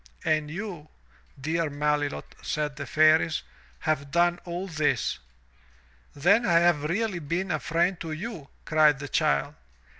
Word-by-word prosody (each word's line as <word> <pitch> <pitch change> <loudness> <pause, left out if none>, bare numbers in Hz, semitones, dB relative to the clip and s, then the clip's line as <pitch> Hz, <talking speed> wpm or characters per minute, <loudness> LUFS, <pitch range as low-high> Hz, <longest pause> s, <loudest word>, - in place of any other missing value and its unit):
"And 155 -1 +1
you, 175 -3 -6 0.5
dear 160 +3 -1
Melilot, 145 0 -1
said 150 -1 -2
the 140 -2 -6
Fairies, 155 +1 +4 0.4
"have 150 -2 -1
done 175 +3 +2
all 175 +2 -4
this. 155 -4 0 1.0
"Then 195 +11 +4
I 175 - +2
have 170 -3 +3
really 195 +3 -1
been 170 +5 -2
a 155 - 0
friend 170 +4 0
to 165 -1 -5
you, 165 -3 -6 0.2
cried 155 -2 +4
the 145 +1 -6
child. 70 0 +1
155 Hz, 140 wpm, -27 LUFS, 150-175 Hz, 1.0 s, Fairies